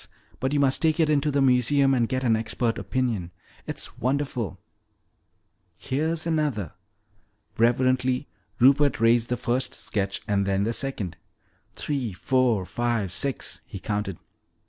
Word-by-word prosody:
But 130 Hz, +2 st, -1 dB
you 145 Hz, -, +1 dB
must 135 Hz, -2 st, +2 dB
take 160 Hz, 0 st, +2 dB
it 155 Hz, -2 st, +3 dB
in 145 Hz, -2 st, +3 dB
to 150 Hz, -, 0 dB
the 140 Hz, -1 st, +2 dB
museum 135 Hz, +2 st, +4 dB
and 120 Hz, -3 st, +1 dB
get 130 Hz, 0 st, -1 dB
an 115 Hz, -3 st, +3 dB
expert 115 Hz, +1 st, -1 dB
opinion. 115 Hz, -9 st, -1 dB, 0.4 s
It's 145 Hz, -4 st, -5 dB
wonderful!" 130 Hz, -, -1 dB, 1.2 s
"Here's 160 Hz, +4 st, -1 dB
another." 150 Hz, -, -1 dB, 0.9 s
Reverently 130 Hz, +3 st, +2 dB, 0.3 s
Rupert 140 Hz, +1 st, +5 dB
raised 115 Hz, +1 st, +4 dB
the 125 Hz, -, 0 dB
first 125 Hz, +1 st, -1 dB
sketch 100 Hz, -1 st, -2 dB
and 100 Hz, -2 st, +1 dB
then 100 Hz, 0 st, +1 dB
the 115 Hz, +3 st, 0 dB
second. 110 Hz, -11 st, -2 dB, 0.6 s
"Three, 135 Hz, -8 st, -2 dB
four, 120 Hz, -1 st, +1 dB
five, 115 Hz, -4 st, -1 dB
six," 135 Hz, +8 st, -2 dB
he -, -, -9 dB
counted. 105 Hz, -2 st, -3 dB
125 Hz, 140 wpm, -25 LUFS, 110-140 Hz, 1.2 s, Rupert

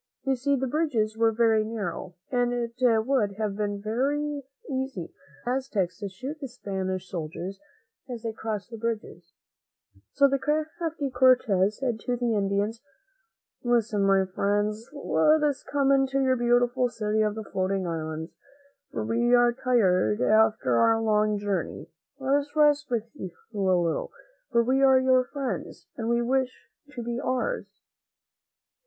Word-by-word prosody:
You 270 Hz, -1 st, +1 dB
see 280 Hz, +3 st, +1 dB
the 265 Hz, 0 st, -1 dB
bridges 250 Hz, -7 st, 0 dB
were 225 Hz, 0 st, +3 dB
very 225 Hz, -1 st, +3 dB
narrow, 200 Hz, -5 st, -5 dB, 0.2 s
and 245 Hz, -1 st, +1 dB
it 240 Hz, 0 st, -3 dB, 0.3 s
would 240 Hz, -7 st, +1 dB
have 210 Hz, -1 st, -2 dB
been 205 Hz, -1 st, -2 dB
very 285 Hz, +7 st, -1 dB, 0.3 s
easy 260 Hz, -, -4 dB, 0.3 s
for 245 Hz, -, -1 dB
the -, -, +2 dB
Aztecs 195 Hz, -10 st, -2 dB
to 200 Hz, -1 st, -4 dB
shoot 265 Hz, +11 st, -7 dB
the 275 Hz, -, -4 dB
Spanish 190 Hz, -6 st, -4 dB
soldiers 175 Hz, +3 st, -5 dB, 0.5 s
as 240 Hz, -2 st, -6 dB
they 225 Hz, -1 st, -3 dB
crossed 220 Hz, 0 st, -5 dB
the 230 Hz, -, -6 dB
bridges; 230 Hz, -1 st, -5 dB, 0.8 s
so 280 Hz, -1 st, +5 dB
the 275 Hz, 0 st, 0 dB
crafty 310 Hz, 0 st, -2 dB
Cortez 215 Hz, -7 st, +3 dB
said 245 Hz, -4 st, -2 dB
to 245 Hz, +2 st, -2 dB
the 240 Hz, -1 st, 0 dB
Indians, 205 Hz, +2 st, 0 dB, 0.8 s
"Listen, 230 Hz, -4 st, +1 dB
my 195 Hz, -1 st, +4 dB
friends; 205 Hz, +3 st, -1 dB
let 305 Hz, +1 st, +2 dB
us 290 Hz, -2 st, +1 dB
come 275 Hz, -1 st, +1 dB
into 270 Hz, 0 st, +2 dB
your 260 Hz, -1 st, +3 dB
beautiful 245 Hz, +1 st, +2 dB
City 215 Hz, -2 st, -1 dB
of 210 Hz, -1 st, +1 dB
the 220 Hz, -, -5 dB
Floating 190 Hz, -1 st, -1 dB
Islands, 160 Hz, -1 st, -4 dB, 0.6 s
for -, -, -3 dB
we 240 Hz, +2 st, +3 dB
are 240 Hz, 0 st, +4 dB
tired 190 Hz, -, +2 dB
after 215 Hz, -, +3 dB
our 225 Hz, -, +4 dB
long 215 Hz, -1 st, +2 dB
journey. 200 Hz, -1 st, -3 dB, 0.3 s
Let 270 Hz, 0 st, +2 dB
us 290 Hz, +1 st, -5 dB
rest 295 Hz, -1 st, +4 dB
with 235 Hz, -3 st, 0 dB
you 190 Hz, -11 st, -6 dB, 0.2 s
a -, -, -7 dB
little, 180 Hz, -4 st, +1 dB, 0.4 s
for 235 Hz, -, +3 dB
we 260 Hz, +3 st, +2 dB
are 265 Hz, -1 st, +6 dB
your 260 Hz, -1 st, +3 dB
friends 275 Hz, 0 st, -5 dB
and 225 Hz, -3 st, -3 dB
we 235 Hz, 0 st, +2 dB
wish 255 Hz, -10 st, -1 dB, 0.2 s
you 290 Hz, -, -19 dB
to 240 Hz, -, -4 dB
be 240 Hz, +1 st, -3 dB
ours." 275 Hz, -, -3 dB
235 Hz, 160 wpm, -27 LUFS, 205-265 Hz, 0.8 s, are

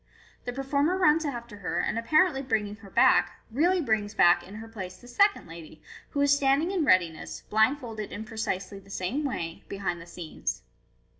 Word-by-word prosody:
The 245 Hz, -, -2 dB
performer 280 Hz, +7 st, 0 dB
runs 320 Hz, -3 st, +4 dB
after 235 Hz, -6 st, -5 dB
her, 185 Hz, -3 st, -3 dB
and 225 Hz, -, 0 dB
apparently 305 Hz, +4 st, +3 dB
bringing 215 Hz, -5 st, -1 dB
her 200 Hz, -3 st, -14 dB
back, -, -, +4 dB
really 345 Hz, +9 st, +2 dB
brings 215 Hz, -5 st, -1 dB
back 175 Hz, -1 st, +5 dB
in 195 Hz, +4 st, -12 dB
her 225 Hz, +1 st, -8 dB
place 190 Hz, -5 st, -7 dB
the 245 Hz, -, -16 dB
second 400 Hz, +10 st, +2 dB
lady, 165 Hz, -1 st, -11 dB, 0.3 s
who 285 Hz, -, -1 dB
is 285 Hz, 0 st, +5 dB
standing 285 Hz, +5 st, +2 dB
in 370 Hz, -5 st, 0 dB
readi 185 Hz, -, +4 dB
ness, 155 Hz, -, -8 dB
blindfolded 220 Hz, -1 st, 0 dB
in 210 Hz, -, -5 dB
precisely 200 Hz, -3 st, -4 dB
the 195 Hz, 0 st, -19 dB
same 200 Hz, +10 st, -2 dB
way, 170 Hz, -, -4 dB
behind 185 Hz, -4 st, -3 dB
the 170 Hz, -, -12 dB
scenes. 170 Hz, -2 st, -5 dB
225 Hz, 180 wpm, -27 LUFS, 190-285 Hz, 0.3 s, back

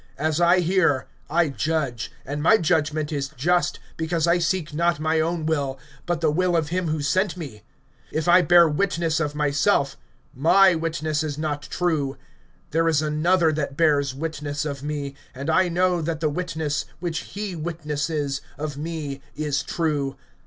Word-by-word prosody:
As 155 Hz, +3 st, 0 dB
I 175 Hz, +1 st, +5 dB
hear, 165 Hz, -6 st, +2 dB, 0.2 s
I 165 Hz, +1 st, +2 dB
judge; 140 Hz, -5 st, -2 dB
and 145 Hz, +2 st, -4 dB
my 220 Hz, +8 st, +6 dB
judgment 155 Hz, -4 st, 0 dB
is 140 Hz, -2 st, -2 dB
just; 175 Hz, +6 st, +1 dB, 0.2 s
because 160 Hz, 0 st, 0 dB
I 170 Hz, +1 st, +3 dB
seek 170 Hz, -2 st, -1 dB
not 170 Hz, 0 st, +1 dB
my 160 Hz, +1 st, +1 dB
own 165 Hz, 0 st, -1 dB
will, 140 Hz, -4 st, -1 dB, 0.3 s
but 170 Hz, -1 st, -1 dB
the 155 Hz, -2 st, +3 dB
will 180 Hz, +2 st, +1 dB
of 155 Hz, -2 st, -1 dB
him 180 Hz, 0 st, -1 dB
who 155 Hz, -1 st, -1 dB
sent 185 Hz, +6 st, +1 dB
me. 135 Hz, -11 st, -8 dB, 0.5 s
(31)If 155 Hz, +2 st, -2 dB
I 175 Hz, +1 st, +7 dB
bear 170 Hz, +1 st, +6 dB
witness 165 Hz, 0 st, 0 dB
of 150 Hz, -2 st, -2 dB
myself, 145 Hz, -1 st, +1 dB, 0.4 s
my 185 Hz, +7 st, +5 dB
witness 160 Hz, -2 st, -1 dB
is 150 Hz, -2 st, -3 dB
not 150 Hz, -2 st, -2 dB
true. 155 Hz, -7 st, -1 dB, 0.5 s
(32)There 165 Hz, +1 st, +2 dB
is 155 Hz, -1 st, +2 dB
another 160 Hz, +3 st, +2 dB
that 145 Hz, -2 st, -3 dB
bears 145 Hz, -5 st, +2 dB
witness 145 Hz, -1 st, -3 dB
of 140 Hz, -2 st, -4 dB
me; 145 Hz, -1 st, -4 dB, 0.2 s
and 140 Hz, +5 st, -2 dB
I 185 Hz, +2 st, +3 dB
know 180 Hz, 0 st, +2 dB
that 160 Hz, 0 st, -2 dB
the 155 Hz, -1 st, +1 dB
witness 160 Hz, -3 st, -2 dB
which 170 Hz, -2 st, -2 dB
he 200 Hz, -1 st, -6 dB
witnesses 150 Hz, -3 st, -2 dB, 0.2 s
of 150 Hz, -1 st, -4 dB
me 150 Hz, -3 st, -5 dB
is 145 Hz, -2 st, -1 dB
true. 145 Hz, -2 st, -1 dB
155 Hz, 165 wpm, -24 LUFS, 145-170 Hz, 0.5 s, I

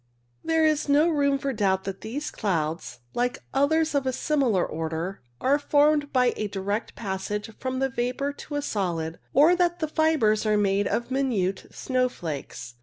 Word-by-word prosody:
There 320 Hz, -1 st, +2 dB
is 305 Hz, -1 st, +1 dB
no 295 Hz, +3 st, +5 dB
room 285 Hz, -3 st, +2 dB
for 275 Hz, 0 st, -2 dB
doubt 190 Hz, -4 st, +1 dB
that 195 Hz, 0 st, -5 dB
these 285 Hz, +7 st, -4 dB
clouds, 165 Hz, -, -2 dB
like 245 Hz, +1 st, 0 dB, 0.2 s
others 315 Hz, +4 st, +2 dB
of 275 Hz, -2 st, +1 dB
a -, -, +2 dB
similar 255 Hz, -9 st, +1 dB
order, 165 Hz, +4 st, -4 dB, 0.2 s
are 280 Hz, +3 st, +2 dB
formed 290 Hz, 0 st, +3 dB
by 250 Hz, -2 st, +3 dB
a 215 Hz, -, -2 dB
direct 200 Hz, +2 st, -3 dB
passage 205 Hz, +1 st, -4 dB
from 260 Hz, 0 st, -3 dB
the 270 Hz, +1 st, +1 dB
vapour 255 Hz, +3 st, -2 dB
to 290 Hz, +1 st, -8 dB
the 290 Hz, -, 0 dB
solid, 170 Hz, -, -2 dB
or 310 Hz, +6 st, +6 dB
that 350 Hz, -1 st, +1 dB
the 315 Hz, -3 st, -1 dB
fibres 305 Hz, -9 st, +2 dB
are 215 Hz, -1 st, +2 dB
made 200 Hz, 0 st, +2 dB
of 235 Hz, +2 st, -2 dB
minute 220 Hz, -9 st, 0 dB
snowflakes. 165 Hz, -, -3 dB
250 Hz, 170 wpm, -26 LUFS, 195-285 Hz, 0.2 s, or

